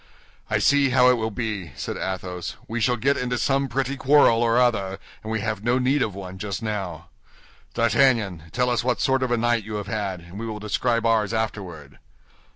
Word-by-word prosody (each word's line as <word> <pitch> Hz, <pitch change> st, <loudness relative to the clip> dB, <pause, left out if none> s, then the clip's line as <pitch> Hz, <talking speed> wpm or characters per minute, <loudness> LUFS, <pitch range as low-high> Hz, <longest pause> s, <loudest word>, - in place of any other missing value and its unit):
"I -, -, +2 dB
see 140 Hz, -1 st, +3 dB
how 125 Hz, 0 st, +5 dB
it 125 Hz, -, +2 dB
will 110 Hz, -1 st, -1 dB
be," 105 Hz, -, -4 dB
said -, -, -4 dB
Athos: 90 Hz, -2 st, -4 dB
"we 115 Hz, +1 st, -3 dB
shall 125 Hz, +2 st, +3 dB
get 140 Hz, +5 st, +1 dB
into 125 Hz, 0 st, -1 dB
some 135 Hz, +3 st, +1 dB
pretty 135 Hz, +2 st, -1 dB
quarrel 130 Hz, -4 st, +5 dB
or 115 Hz, 0 st, +3 dB
other, 100 Hz, -6 st, +1 dB, 0.2 s
and 110 Hz, -, -6 dB
we 110 Hz, -1 st, -1 dB
have 105 Hz, -1 st, -3 dB
no 120 Hz, +2 st, +2 dB
need 130 Hz, +3 st, +2 dB
of 105 Hz, -6 st, -1 dB
one 95 Hz, -1 st, -8 dB
just 100 Hz, +1 st, -4 dB
now. 100 Hz, -7 st, -4 dB, 0.7 s
D'Artagnan, 115 Hz, -, +2 dB
tell 125 Hz, 0 st, +1 dB
us 120 Hz, -2 st, 0 dB
what 125 Hz, -4 st, 0 dB
sort 135 Hz, 0 st, +2 dB
of 130 Hz, -, 0 dB
a 120 Hz, -, +1 dB
night 120 Hz, -1 st, +1 dB
you 105 Hz, +1 st, -6 dB
have 105 Hz, -1 st, -3 dB
had, 100 Hz, -3 st, -3 dB
and 85 Hz, +4 st, -10 dB
we 115 Hz, -, -4 dB
will 110 Hz, -1 st, -4 dB
describe 115 Hz, +2 st, 0 dB
ours 115 Hz, -1 st, +2 dB
afterward." 90 Hz, -10 st, -5 dB
110 Hz, 205 wpm, -24 LUFS, 100-125 Hz, 0.7 s, how